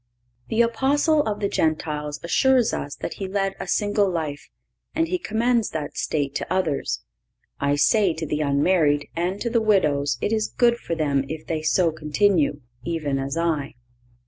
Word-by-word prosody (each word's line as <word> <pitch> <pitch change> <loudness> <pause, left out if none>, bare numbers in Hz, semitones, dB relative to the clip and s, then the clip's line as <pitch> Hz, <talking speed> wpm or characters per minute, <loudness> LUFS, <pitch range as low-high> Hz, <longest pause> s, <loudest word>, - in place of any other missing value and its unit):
The 230 +1 +3
Apostle 285 +6 +2
of 210 -1 -2
the 200 - +2
Gentiles 150 -4 -1
assures 250 +7 +3
us 145 - -4
that - - -5
he 195 - -2
led 195 0 -1
a - - -5
single 205 +1 +1
life, 155 -5 -4 0.5
and 325 +1 +1
he 365 +2 -1
commends 230 -2 +1
that 150 -2 -5
state 145 -2 -1
to - - -6
others: 185 -7 -1 0.6
"I 140 +1 +1
say 190 +3 +3
to 160 - -4
the 150 0 -2
unmarried, 145 0 +2
and 180 +4 -1
to 235 - -1
the 230 -1 +2
widows 150 -10 +2
it 215 - -1
is 215 -1 +1
good 240 -1 +2
for 165 - -3
them 140 -4 +1
if 155 0 -6
they 160 -2 -2
so 165 +2 +2
continue, 155 0 +1 0.2
even 155 -5 -2
as 135 +3 -3
I." 160 -6 -1
170 Hz, 170 wpm, -23 LUFS, 150-215 Hz, 0.6 s, The